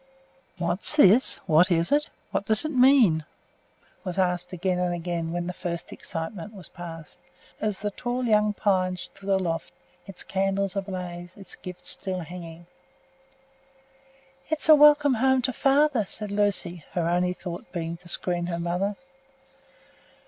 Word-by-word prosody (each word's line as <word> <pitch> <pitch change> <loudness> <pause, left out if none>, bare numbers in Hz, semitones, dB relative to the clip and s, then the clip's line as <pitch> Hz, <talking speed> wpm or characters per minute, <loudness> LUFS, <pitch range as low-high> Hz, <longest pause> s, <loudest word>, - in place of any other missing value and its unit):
"What's 175 - +1
this? 240 -3 +5
What 165 +5 +5
is 170 -1 +1
it? 295 +1 +2 0.2
What 200 - -2
does 220 +4 +3
this 310 - -2
mean?" 250 - +5 0.8
was 185 -1 -5
asked 180 -1 0
again 180 0 -1
and 180 -1 0
again, 170 -1 -3
when 175 0 -2
the 180 - -4
first 170 -2 -5
excitement 170 +5 -6
was 190 - -10
passed, 165 -3 -10 0.4
as 210 -3 -1
the 205 0 -3
tall 245 +4 -3
young 210 -2 +3
pine 185 -3 +1
stood 195 +2 -9
aloft, 180 -4 -1 0.3
its 195 -2 -8
candles 195 0 -1
ablaze, 180 -2 -5
its 195 - -8
gifts 180 -1 -7
still 185 -1 -3
hanging. 170 0 -9 1.8
"It's 315 0 0
welcome 295 -2 +7
home 260 +2 +2
to 255 +1 +1
father!" 275 -3 +3
said 205 +1 -7
Lucy, 200 -5 0
her 170 -2 0
only 180 +1 +1
thought 175 0 -8
to 170 -1 -4
screen 175 -1 0
her 170 -1 -3
mother. 180 +4 -1
185 Hz, 140 wpm, -26 LUFS, 175-210 Hz, 1.8 s, welcome